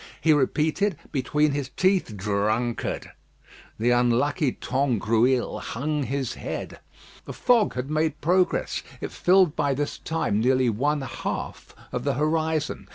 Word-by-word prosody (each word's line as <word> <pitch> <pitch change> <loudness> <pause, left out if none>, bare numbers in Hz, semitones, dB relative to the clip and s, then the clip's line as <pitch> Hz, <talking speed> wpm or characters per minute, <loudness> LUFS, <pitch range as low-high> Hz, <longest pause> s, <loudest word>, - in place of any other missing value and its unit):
He 160 - +4
repeated, 155 +6 +1
between 150 +2 +1
his 140 -2 -3
teeth, 185 - +1
"Drunkard." 105 +4 -1 0.7
The 120 +3 +2
unlucky 125 +5 +2
Tangrouille 125 -1 +1
hung 150 +5 -2
his 135 -2 -2
head. - - -6 0.5
The - - -7
fog 235 - +2
had 125 +3 -4
made 155 -1 0
progress. 180 +3 +1 0.2
It - - -5
filled 180 -3 +3
by 140 -2 +1
this 145 +1 -3
time 160 -10 -1
nearly 130 +1 +3
one 145 +7 0
half 135 - -5 0.2
of 125 - -3
the 140 -1 0
horizon. 155 +1 -1
140 Hz, 130 wpm, -25 LUFS, 120-155 Hz, 0.7 s, He